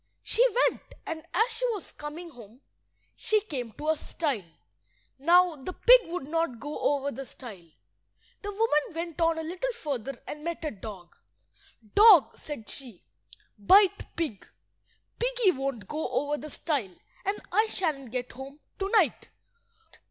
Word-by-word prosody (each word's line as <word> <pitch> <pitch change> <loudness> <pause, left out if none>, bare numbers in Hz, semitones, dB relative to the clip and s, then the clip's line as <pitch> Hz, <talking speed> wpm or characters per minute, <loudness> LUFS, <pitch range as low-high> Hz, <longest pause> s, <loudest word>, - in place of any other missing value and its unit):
She 470 - +3 0.2
went; - - -3 0.2
and 320 -1 -4
as 445 +7 +2
she 455 +2 -4
was 400 -6 -6
coming 320 +3 -8
home 235 -1 -15 0.5
she 435 - +3
came 265 - -5
to 300 +8 -4
a 315 - +4
stile. 275 - -3 0.7
Now 350 +3 +5
the 290 +6 -7
pig - - +6
would 345 -5 -4
not 325 -6 -1
go 290 +4 -5
over 285 -1 +1
the 275 - -6
stile. 215 -9 -11 0.7
The 410 - -4
woman 395 -8 +1
went 335 0 -4
on 330 0 +3
a 320 - -3
little 365 +10 -2
further 275 - -4
and 300 0 -7
met 335 -1 -4
a 305 - -1
dog— 195 -4 -10 0.8
"Dog," 415 -7 +8
said 290 -8 -8
she, 245 -9 -7 0.6
"bite 390 - +4
pig. 300 - -3 0.7
Piggy - - +3
won't 270 - -4
go 310 +1 -3
over 290 +1 0
the 305 +1 -7
stile, 265 - -2 0.3
and 400 +2 -1
I 435 +1 +3
shan't 305 - -2
get 250 +1 -4
home 270 +3 -10 0.2
to–night." 400 +3 +2
305 Hz, 150 wpm, -28 LUFS, 265-365 Hz, 0.8 s, Dog